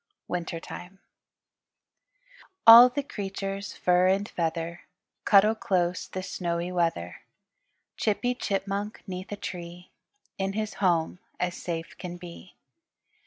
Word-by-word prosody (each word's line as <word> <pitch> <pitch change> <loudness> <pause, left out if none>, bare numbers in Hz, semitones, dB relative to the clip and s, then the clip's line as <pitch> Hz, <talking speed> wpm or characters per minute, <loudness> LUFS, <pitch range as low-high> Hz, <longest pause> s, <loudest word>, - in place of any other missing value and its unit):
WINTER 170 -1 -3
TIME 180 +3 -10 1.7
All 235 +2 +11
the 285 +3 -3
creatures, 195 -4 -5
fur 180 0 +3
and 195 +2 +2
feather, 165 0 -3 0.4
Cuddle 210 +1 +6
close 180 -5 -1
this 185 0 -6
snowy 170 0 -2
weather; 165 - -1 0.8
Chippy 245 +4 0
Chipmunk 200 -2 -3
'neath 185 -1 -7
a - - -2
tree 175 -2 -8 0.5
In 195 0 -1
his 215 0 -3
home 175 -2 +1 0.2
as 180 0 -1
safe 165 -2 -5
can 175 -1 -6
be. 175 +1 -12
185 Hz, 115 wpm, -27 LUFS, 175-200 Hz, 1.7 s, All